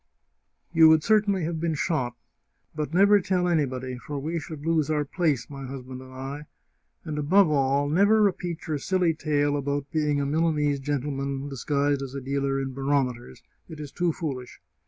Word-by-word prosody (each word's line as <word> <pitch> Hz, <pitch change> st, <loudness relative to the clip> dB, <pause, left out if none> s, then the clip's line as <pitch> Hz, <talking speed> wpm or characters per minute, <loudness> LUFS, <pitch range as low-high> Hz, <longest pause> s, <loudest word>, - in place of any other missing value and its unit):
You 160 Hz, -1 st, +7 dB
would 160 Hz, -1 st, +5 dB
certainly 205 Hz, -4 st, +2 dB
have 160 Hz, 0 st, -2 dB
been 165 Hz, -1 st, -1 dB
shot. 130 Hz, -6 st, -1 dB, 0.6 s
But 150 Hz, -2 st, -3 dB
never 200 Hz, +4 st, +5 dB
tell 180 Hz, -1 st, 0 dB
anybody, 130 Hz, -6 st, -1 dB
for 140 Hz, +5 st, -6 dB
we 160 Hz, +4 st, -2 dB
should 155 Hz, -1 st, -8 dB
lose 160 Hz, -2 st, +1 dB
our 150 Hz, -1 st, +1 dB
place, 145 Hz, -7 st, 0 dB
my 135 Hz, -2 st, -8 dB
husband 130 Hz, -1 st, -8 dB
and 130 Hz, 0 st, -12 dB
I. 135 Hz, +3 st, -7 dB, 0.6 s
And, 150 Hz, -1 st, -3 dB
above 170 Hz, +3 st, +4 dB
all, 140 Hz, 0 st, +2 dB
never 200 Hz, +8 st, +4 dB
repeat 175 Hz, -4 st, -1 dB
your 155 Hz, -2 st, -2 dB
silly 180 Hz, 0 st, +1 dB
tale 145 Hz, -2 st, 0 dB
about 140 Hz, 0 st, -2 dB
being 150 Hz, -2 st, +1 dB
a 140 Hz, -, 0 dB
Milanese 150 Hz, -1 st, +1 dB
gentleman 140 Hz, 0 st, -3 dB
dis 135 Hz, -3 st, -7 dB
guised 145 Hz, -1 st, +1 dB
as 135 Hz, 0 st, -6 dB
a -, -, -2 dB
dealer 135 Hz, +1 st, -1 dB
in 135 Hz, -1 st, -4 dB
barometers; 130 Hz, -, -2 dB, 0.3 s
it 160 Hz, -, -9 dB
is 145 Hz, -2 st, -7 dB
too 175 Hz, -1 st, 0 dB
foolish! 135 Hz, -6 st, -6 dB
145 Hz, 175 wpm, -26 LUFS, 135-165 Hz, 0.6 s, You